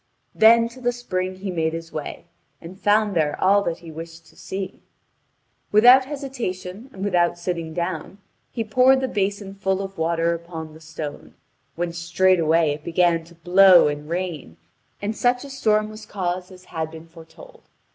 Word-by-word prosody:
Then 230 Hz, +1 st, +6 dB
to 255 Hz, +2 st, -14 dB
the 245 Hz, 0 st, +1 dB
spring 185 Hz, -6 st, -3 dB
he 190 Hz, +1 st, -5 dB
made 160 Hz, -2 st, -1 dB
his 165 Hz, 0 st, -6 dB
way, 155 Hz, +2 st, -6 dB, 0.3 s
and 180 Hz, +4 st, -12 dB
found 210 Hz, -1 st, +2 dB
there 150 Hz, -3 st, 0 dB
all 200 Hz, +2 st, +4 dB
that 170 Hz, -1 st, -2 dB
he 165 Hz, -, -8 dB
wished 165 Hz, +1 st, -10 dB
to -, -, -21 dB
see. 190 Hz, -1 st, -6 dB, 0.9 s
Without 245 Hz, +5 st, +7 dB
hesitation 245 Hz, -7 st, -6 dB
and 195 Hz, -2 st, -6 dB
without 175 Hz, -3 st, +2 dB
sitting 170 Hz, -2 st, -4 dB
down 170 Hz, +2 st, -4 dB, 0.3 s
he 230 Hz, -, -2 dB
poured 255 Hz, +5 st, +4 dB
the 260 Hz, -, -1 dB
basin 200 Hz, -2 st, -2 dB
full 190 Hz, -1 st, -1 dB
of 195 Hz, -2 st, -6 dB
water 165 Hz, +1 st, +1 dB
upon 165 Hz, -2 st, -7 dB
the 160 Hz, -, -14 dB
stone, 155 Hz, -2 st, -8 dB, 0.4 s
when 170 Hz, 0 st, -3 dB
straightway 170 Hz, -2 st, +2 dB
it 150 Hz, +1 st, -6 dB
began 170 Hz, 0 st, +2 dB
to 170 Hz, +1 st, -17 dB
blow 180 Hz, +1 st, +6 dB
and 150 Hz, +1 st, -4 dB
rain, 170 Hz, -, -4 dB, 0.5 s
and 210 Hz, +2 st, -2 dB
such 245 Hz, +2 st, +1 dB
a 280 Hz, -, -9 dB
storm 215 Hz, -5 st, +1 dB
was 215 Hz, 0 st, -11 dB
caused 180 Hz, -1 st, -3 dB
as 185 Hz, 0 st, -14 dB
had 160 Hz, -1 st, -2 dB
been 160 Hz, 0 st, -11 dB
foretold. 165 Hz, 0 st, -15 dB
180 Hz, 170 wpm, -23 LUFS, 165-205 Hz, 0.9 s, Without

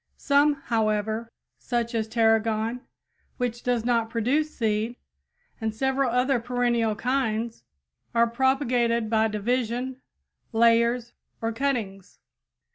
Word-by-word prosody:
Some, 285 Hz, +1 st, +3 dB
however, 220 Hz, 0 st, -1 dB, 0.3 s
such 235 Hz, -1 st, -2 dB
as 225 Hz, -1 st, -1 dB
tarragon, 225 Hz, +1 st, +1 dB, 0.6 s
which 240 Hz, -2 st, -2 dB
does 245 Hz, -2 st, 0 dB
not 230 Hz, -2 st, +1 dB
produce 250 Hz, +7 st, +1 dB
seed, 220 Hz, +1 st, 0 dB, 0.6 s
and 220 Hz, -2 st, -2 dB
several 265 Hz, +2 st, +1 dB
other 250 Hz, +2 st, +2 dB
perennial 240 Hz, -2 st, 0 dB
kinds, 230 Hz, -1 st, -1 dB, 0.5 s
are 235 Hz, 0 st, +5 dB
propagated 235 Hz, -2 st, +1 dB
by 220 Hz, 0 st, +3 dB
division, 245 Hz, +4 st, -2 dB, 0.5 s
layers, 235 Hz, +1 st, +3 dB, 0.3 s
or 225 Hz, 0 st, -2 dB
cuttings. 225 Hz, -7 st, -3 dB
235 Hz, 105 wpm, -26 LUFS, 225-250 Hz, 0.6 s, are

